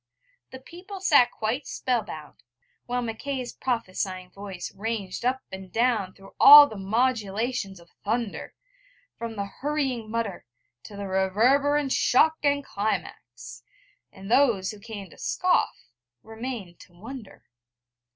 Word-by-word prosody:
The 260 - -9
people 360 +8 -10
sat 285 -9 +5
quite 225 +6 -3
spell 250 -3 -1
bound, 155 -7 -10 0.5
while 245 0 -1
Mackay's 250 +3 -4
prophesying 185 -6 -3
voice 195 -2 -7
ranged 205 -1 -4
up 260 +2 0
and 190 -1 -9
down 225 -4 +1
through 195 0 -16
all 290 +1 +12
the 220 - -9
modulations 215 -1 -1
of 170 0 -19
thunder, 225 0 -3 0.6
from 230 -1 -5
the 200 -1 -3
hurrying 265 -1 -3
mutter 220 -4 -3 0.4
to 205 - -10
the 200 - -5
reverberant 260 +10 +2
shock 315 +7 +3
and 285 -1 +1
climax: 125 - -4 0.5
and 195 +2 -10
those 235 -8 +3
who 210 - -12
came 205 -2 -8
to - - -16
scoff 365 - 0 0.3
remained 225 -6 -7
to 175 - -17
wonder. 220 +4 -11
225 Hz, 130 wpm, -26 LUFS, 195-260 Hz, 0.6 s, all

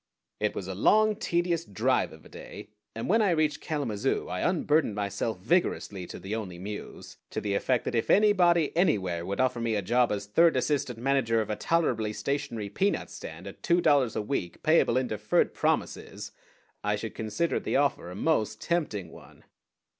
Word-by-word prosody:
It 105 0 -1
was 95 - -5
a 95 - -4
long, 215 - +4
tedious 175 -5 0
drive 100 - 0
of - - -15
a - - -14
day, - - -10 0.3
and 115 - -4
when 220 +5 +3
I 205 - +3
reached 155 -3 +1
Kalamazoo 135 - -2
I 90 0 -3
unburdened 155 - +1
myself 100 +1 -2
vigorously 100 - 0
to - - -8
the 95 +4 -6
Only 100 -6 -4
Muse 105 +3 -8
to - - -3
the 100 -1 -2
effect 125 +4 0
that - - -2
if 115 - 0
anybody, 180 -6 +4
anywhere, 95 - +1
would 100 +1 -3
offer 125 -2 +1
me 115 -1 0
a 100 - -1
job 120 +4 +2
as 100 -1 -2
third 165 +11 +4
assistant 140 -5 -1
manager 125 -2 +1
of 110 -1 -2
a - - -1
tolerably 110 -4 0
stationary 115 -2 -3
peanut 195 - -1
stand - - -9
at - - -10
two 170 0 +3
dollars 140 -8 +3
a 110 - -1
week, 105 -7 -4
payable 155 -6 +4
in 130 - +1
deferred 105 -2 0
promises, - - -2 0.5
I 105 0 +1
should 110 +2 -5
consider 115 +10 -1
the - - -3
offer 140 -10 +1
a 90 - -8
most 110 -1 0
tempting 110 - -2
one. - - -15
120 Hz, 185 wpm, -28 LUFS, 105-160 Hz, 0.5 s, long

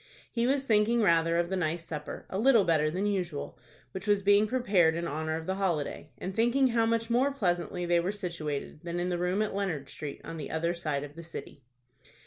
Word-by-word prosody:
He 235 0 +1
was 275 +1 +1
thinking 225 0 +3
rather 165 -2 +3
of 170 +1 0
the - - +1
nice 170 -1 -1
supper,—a 160 +4 -5
little 235 -2 +5
better 155 -3 +2
than 185 +6 -2
usual,—which 160 - -5
was 205 -1 +3
being 205 +2 +5
prepared 200 -10 +3
in 170 0 -2
honor 155 +2 -2
of 160 0 -5
the 190 - -1
holiday, 155 -5 -1
and 190 - -5
thinking 240 +4 +3
how 230 -1 +2
much 230 0 0
more 260 +4 +3
pleasantly 180 -7 -1
they 175 0 +3
were 175 +3 0
situated 170 -8 -4
than 170 0 -4
in 175 +1 -1
the 175 -1 -1
room 180 +4 +1
at 215 - -3
Leonard 180 -9 -2
Street, 145 -2 -6
on 165 - -7
the 150 - -5
other 170 +2 0
side 150 -5 -2
of 145 0 -9
the 170 - -8
city. 160 -3 -8
175 Hz, 210 wpm, -29 LUFS, 160-210 Hz, -, little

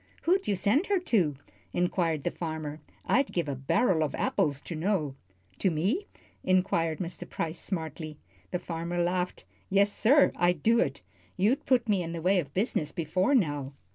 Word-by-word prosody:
"Who'd 375 +3 +2
you 205 - +2
send 215 - +2
her 405 - +3
to?" 200 - +1 0.4
inquired 175 -4 0
the 175 - 0
farmer. 155 -2 -5 0.2
"I'd 275 +2 +2
give 170 -3 -1
a 140 - -1
barrel 160 - +2
of 150 - -2
apples 140 -2 0
to - - -6
know." 160 -4 0 0.5
"To 190 - +3
me?" 190 - 0 0.4
inquired 175 -4 +2
Mr. 175 -2 -6
Price, 165 +1 -3
smartly. 160 -4 -5 0.3
The 180 - -1
farmer 170 0 -4
laughed. 180 +1 -1 0.2
"Yes, 200 +1 +3
sir 280 +6 +5
I'd 175 -3 +2
do 230 +1 +4
it. - - 0 0.4
You've 215 +9 +1
put 245 -3 +3
me 200 -4 +2
in 165 -1 -4
the 165 - -4
way 190 +1 +4
of 145 -5 -4
business 180 - 0
before 185 - +1
now." 145 - 0
175 Hz, 170 wpm, -29 LUFS, 160-205 Hz, 0.5 s, sir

